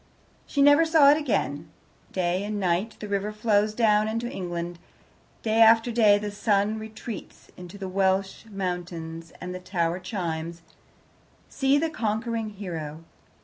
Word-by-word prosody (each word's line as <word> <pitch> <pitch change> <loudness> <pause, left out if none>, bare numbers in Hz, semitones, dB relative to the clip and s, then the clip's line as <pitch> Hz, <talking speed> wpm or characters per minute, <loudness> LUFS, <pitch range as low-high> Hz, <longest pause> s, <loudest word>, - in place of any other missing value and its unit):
She 280 - +2
never 290 +3 +7
saw 320 -3 +6
it 295 - +4
again. 155 - -1 0.4
Day 180 +1 0
and 210 0 -3
night 190 +4 0
the 210 - -6
river 200 +1 -1
flows 210 0 +1
down 215 -2 +3
into 230 +2 -2
England, 175 -4 -5 0.6
day 225 0 +2
after 225 +1 +6
day 215 -3 +5
the 205 0 -4
sun 205 +1 +1
retreats 220 -1 -9
into 180 +2 -10
the 195 -1 -5
Welsh 190 +1 0
mountains, 175 -4 -5
and 180 0 -6
the 185 - -6
tower 175 -1 -1
chimes, 170 -3 -4 0.9
"See 270 +1 +2
the 320 +2 0
Conquering 225 -3 -2
Hero." 165 -6 -6
205 Hz, 145 wpm, -26 LUFS, 180-225 Hz, 0.9 s, never